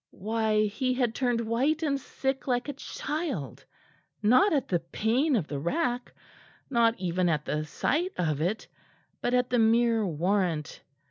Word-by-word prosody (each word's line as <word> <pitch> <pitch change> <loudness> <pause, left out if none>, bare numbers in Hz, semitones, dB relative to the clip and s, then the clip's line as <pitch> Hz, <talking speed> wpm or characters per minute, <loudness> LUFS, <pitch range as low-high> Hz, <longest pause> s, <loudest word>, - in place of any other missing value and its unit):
Why, 215 +1 +1
he 255 +5 -1
had 245 -3 +1
turned 245 -2 0
white 265 +8 0
and 280 -3 +1
sick 270 +1 -3
like 245 0 0
a 285 - -3
child, 280 - -4 0.6
not 250 - +5
at 280 -4 +1
the 175 - +1
pain 230 - +1
of 195 -9 0
the 145 - -4
rack, 245 - -1 0.6
not 235 -2 +3
even 180 -1 0
at 150 -2 0
the 150 +1 -2
sight 325 - -1
of 155 -4 0
it, 190 +7 -1 0.5
but 245 - +1
at 250 0 +1
the 245 - +3
mere 230 0 +3
warrant! 175 -2 -1
230 Hz, 155 wpm, -28 LUFS, 180-260 Hz, 0.6 s, not